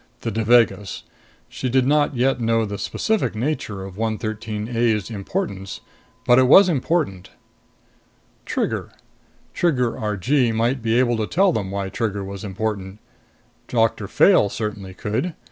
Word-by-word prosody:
The - - -3
Devagas. 110 -2 +2 0.4
She 130 - -4
did 130 +1 +2
not 145 0 +2
yet 125 0 +1
know 115 0 +2
the 100 -1 -5
specific 220 - -1
nature 110 -6 -3
of 95 0 -10
113 110 -1 -3
A's 115 -2 +1
importance. 100 - -4 0.5
But 120 +1 +6
it 130 - +4
was 190 +8 +8
important. 145 - -1 1.1
Trigger: - - -2 0.6
Trigger 125 -9 +1
Argee 115 +5 +1
might 115 +4 0
be 115 +1 +1
able 120 -2 +2
to 110 -1 -1
tell 195 +1 +3
them 100 -3 -2
why 100 0 -3
Trigger 105 -1 -2
was 100 0 -7
important. 100 -1 -4 0.7
Doctor 115 -3 +1
Fayle 105 - +4
certainly 100 -4 -5
could. 110 - -2
115 Hz, 135 wpm, -22 LUFS, 100-130 Hz, 1.1 s, was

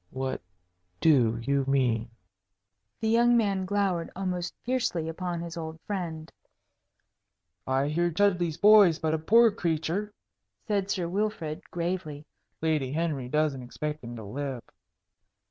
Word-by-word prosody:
"What 130 0 -3 0.6
do 125 -8 +4
you 140 +2 +1
mean?" 125 -5 +1 0.9
The 220 - 0
young 235 +2 +4
man 200 -4 +1
glowered 190 -4 0
almost 180 -2 -3
fiercely 235 -10 -1
upon 175 +1 -3
his 170 -1 -6
old 160 -1 -6
friend. 165 -5 -4 1.4
"I 135 +2 +1
hear 170 +4 +1
Chudleigh's 175 -3 +1
boy 210 -1 +8
is 165 -2 0
but 160 -1 -1
a 160 - 0
poor 230 +7 +5
creature," 175 +2 -2 0.6
said 200 -3 0
Sir 180 -3 -1
Wilfrid, 175 -5 -3
gravely. 170 -4 -3 0.4
"Lady 155 -5 0
Henry 150 -6 -2
doesn't 150 -2 0
expect 150 +4 -5
him 120 0 -7
to 110 - -8
live." 130 +3 -5
165 Hz, 130 wpm, -28 LUFS, 145-190 Hz, 1.4 s, boy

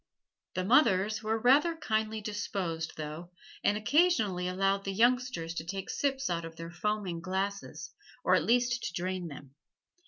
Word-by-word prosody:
The 185 - 0
mothers 215 -3 +4
were 220 0 0
rather 280 +9 +4
kindly 220 -5 -1
disposed, 195 -6 -3
though, 155 +3 -6 0.3
and 205 - +3
occasionally 215 - +2
allowed 195 +2 +1
the 195 - -2
youngsters 240 -5 +1
to 165 - -4
take 190 +3 -5
sips 270 -2 0
out 170 -1 -1
of 165 0 -8
their 165 0 -7
foaming 190 -1 -2
glasses, 195 +2 -3 0.3
or - - +3
at - - +4
least 240 0 +2
to - - -3
drain 180 0 -3
them. 140 -3 -10
200 Hz, 155 wpm, -30 LUFS, 175-230 Hz, 0.3 s, mothers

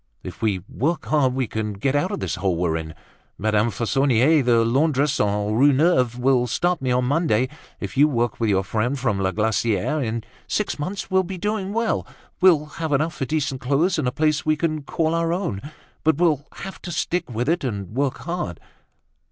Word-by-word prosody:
"If 90 - -9
we 100 -5 0
work 155 +6 -1
hard 135 -4 +2
we 130 -1 0
can 110 -1 -3
get 130 +8 -1
out 175 +6 +1
of 205 - -4
the - - -3
hole 95 -2 +1
we're 85 -2 0
in. 80 -1 -5 0.4
Madame 110 +2 +1
Fauconnier, 135 - +3
the 115 -2 +3
laundress 140 +3 +2
on 105 0 0
Rue 135 +6 +5
Neuve, 130 -5 +2
will 125 -1 +2
start 175 +5 0
me 130 - -1
on 125 0 +2
Monday. 130 -4 +1 0.3
If 100 -1 -6
you 145 +3 +6
work 120 -5 -1
with 115 -2 +1
your 95 -1 +2
friend 110 +8 -1
from 120 -6 0
La 95 -1 +1
Glaciere, 110 +6 0
in 115 -1 -3 0.2
six 210 -7 -1
months 185 +6 -4
we 190 - +3
will 190 - +4
be 185 +1 -6
doing 205 0 -2
well. 230 +1 -1 0.3
We'll 165 -5 +5 0.2
have 160 -2 -1
enough 155 +4 +1
for 135 - -2
decent 140 -2 -2
clothes 155 +8 +1
and 140 - 0
a - - +1
place 155 +2 +1
we 155 0 +2
can 155 -1 -1
call 160 +3 -1
our 165 0 +1
own. 170 - -2 0.4
But 160 0 +3
we'll 155 -4 +1
have 195 - -8
to 175 - -6
stick 175 0 -1
with 120 +2 -2
it 170 +1 +1
and 100 -7 -3
work 135 +3 -1
hard." 170 - -4
135 Hz, 205 wpm, -23 LUFS, 110-160 Hz, 0.4 s, you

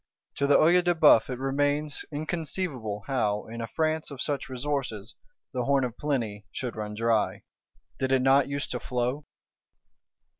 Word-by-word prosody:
To 140 - +1
the 145 - +6
Œil 175 +3 +5
de 175 0 +2
Bœuf 150 -9 +6
it 125 - -3
remains 145 +3 0
inconceivable 150 - -3
how, 105 -6 0
in 115 +1 -7
a 115 - -3
France 160 +2 -1
of 140 -3 -9
such 140 -1 -2
resources, 130 -6 -3 0.4
the 125 -1 -1
Horn 140 -1 +3
of 120 -2 -3
Plenty 115 -8 -2
should 125 -2 -4
run 105 -1 -5
dry: 115 -1 +1 0.6
did 130 -1 0
it 130 -1 +3
not 135 +1 +5
use 140 +1 -2
to 125 - -3
flow? 125 +4 -2
135 Hz, 160 wpm, -27 LUFS, 115-145 Hz, 0.6 s, the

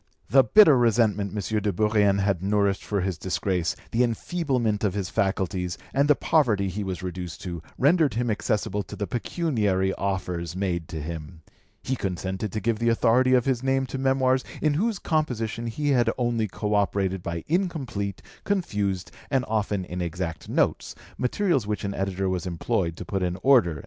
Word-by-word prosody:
The 135 0 +7
bitter 195 - +7
resentment 110 -4 +2
M. 105 +1 -1
de 105 - 0
Bourrienne 105 0 +2
had 95 -3 +1
nourished 100 0 +1
for 100 -2 -1
his 90 -2 -2
disgrace, 90 -2 -1 0.2
the 115 - +1
enfeeblement 120 -4 -1
of 100 -2 +1
his 95 -3 -3
faculties, 95 -2 -1 0.2
and 140 +1 +3
the 150 - +5
poverty 110 -14 +2
he 100 +3 -4
was 95 -2 -4
reduced 90 -2 -5
to, 85 -4 -5 0.2
rendered 150 -2 +3
him 120 0 0
accessible 105 -1 -1
to - - -8
the 105 - -2
pecuniary 105 - 0
offers 90 -3 -3
made 90 -4 -2
to 80 - -5
him. 80 +1 -7 0.4
He 130 - -1
consented 95 0 -3
to 110 - -2
give 110 +1 0
the 115 0 +2
authority 125 +3 +4
of 125 - +2
his 130 -3 +1
name 135 0 +1
to 135 - -2
Memoirs 130 -1 +2 0.2
in 155 -1 +2
whose 210 +7 0
composition 120 -9 -1
he 145 +6 -2
had 125 -4 +3
only 120 -3 0
co 105 +2 -3
operated 100 -2 +1
by 85 -1 -4
incomplete, 145 - -2 0.2
confused, 105 - -1 0.2
and 130 -2 +1
often 105 -3 -1
inexact 85 -2 -4
notes, - - 0 0.2
materials 135 - +1
which 105 0 -2
an 100 0 -2
editor 95 0 -2
was 95 0 -2
employed 85 -1 -1
to - - -7
put 95 -1 -2
in 90 -1 -1
order." 115 - +4
105 Hz, 175 wpm, -25 LUFS, 95-125 Hz, 0.4 s, The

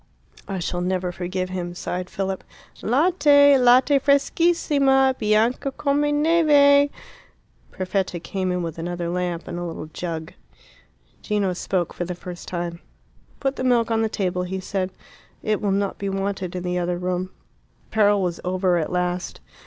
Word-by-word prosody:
"I 195 - -3
shall 175 0 -3
never 180 0 -1
forgive 185 +1 -3
him," 175 -1 -4
sighed 180 0 -4
Philip. 195 -1 -3 0.4
"Latte! 285 +1 +5
latte 255 +3 +5
freschissima! 280 -2 +3
bianca 220 +5 +1
come 280 +1 0 0.2
neve!" 290 -3 +5 0.8
Perfetta 185 -1 -2
came 185 +1 -3
in 180 -1 -1
with 165 -1 -5
another 175 0 -3
lamp 175 -1 -3
and 175 - -5
a - - -4
little 165 -2 -5
jug. 165 -2 -5 0.9
Gino 205 -3 0
spoke 180 -1 -2
for 175 - -4
the 180 +1 -5
first 175 0 -9
time. 170 -1 -4 0.6
"Put 270 -1 -1
the - - -3
milk 240 -2 +2
on 225 0 +2
the 220 - +1
table," 180 -4 -1
he 185 +1 -3
said. 185 0 -2 0.5
"It 215 -1 0
will 205 - 0
not 200 0 -1
be 200 - -2
wanted 195 -2 -3
in 180 - -4
the 180 0 -1
other 175 0 -1
room." 180 +1 -2 0.5
The - - -33
peril 205 -2 +4
was 175 -2 -2
over 180 -1 +1
at 155 - -3
last. 180 0 -2
190 Hz, 160 wpm, -23 LUFS, 180-250 Hz, 0.9 s, Latte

